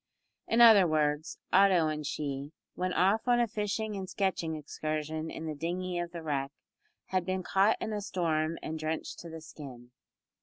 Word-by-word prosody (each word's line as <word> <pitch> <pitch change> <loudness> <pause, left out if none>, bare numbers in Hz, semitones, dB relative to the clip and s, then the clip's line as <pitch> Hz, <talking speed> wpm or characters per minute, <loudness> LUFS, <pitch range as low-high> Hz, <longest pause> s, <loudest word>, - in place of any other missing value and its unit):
In 230 +1 +3
other 215 -6 +9
words, 150 0 0 0.2
Otto 185 -5 +5
and 155 0 -2
she, 140 0 -4 0.2
when 185 0 -2
off 195 +7 +2
on 240 -1 +4
a 240 - +3
fishing 210 0 -2
and 190 -1 -5
sketching 180 -5 -1
excursion 155 +1 -4
in 160 - -6
the 155 - -3
dinghy 175 +4 -3
of 175 0 -4
the 170 -2 -7
wreck, 140 -3 -2 0.6
had 185 -1 +1
been 185 0 -2
caught 195 +5 +3
in 220 - -3
a 210 - -2
storm 165 -4 -1
and 160 0 -4
drenched 155 +1 -3
to 170 - -9
the 160 0 -8
skin. 130 -6 -11
165 Hz, 180 wpm, -30 LUFS, 155-195 Hz, 0.6 s, other